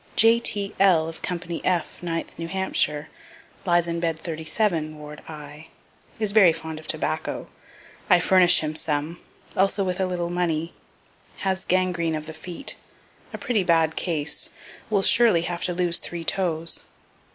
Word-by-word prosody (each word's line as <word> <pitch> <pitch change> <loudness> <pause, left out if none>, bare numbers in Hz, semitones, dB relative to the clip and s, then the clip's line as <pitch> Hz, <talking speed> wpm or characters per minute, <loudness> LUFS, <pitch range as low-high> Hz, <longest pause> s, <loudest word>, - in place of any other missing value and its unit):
J.T.L., 200 -6 +4
of 165 0 -8
company 170 -1 -3
F, 180 -3 -1
9th 165 -2 -4
New 165 - -4
Hampshire, 165 -5 -1 0.6
lies 175 -1 +4
in 170 0 -2
bed 165 -1 -1
37, 160 0 -1
ward 150 0 -10
I. 150 0 -10 0.5
Is 215 -2 0
very 200 -5 +7
fond 160 -1 -6
of 155 - -13
tobacco. - - -2 0.6
I 180 -2 +7
furnish 180 0 +5
him 155 0 -3
some; 155 +2 -2 0.4
also 195 +1 +2
with 185 0 -2
a 190 - +1
little 175 -1 -2
money. 170 -2 -1 0.7
Has 190 0 -1
gangrene 175 -3 +1
of 155 0 -5
the 160 - -8
feet; 170 +2 -2 0.5
a - - -6
pretty 220 -6 0
bad 165 -2 +2
case; 160 -4 -1 0.4
will 200 -3 +2
surely 205 -5 +5
have 170 0 -3
to 180 - 0
lose 175 -1 +2
three 170 -1 -6
toes. 165 -2 +1
170 Hz, 150 wpm, -24 LUFS, 160-185 Hz, 0.7 s, very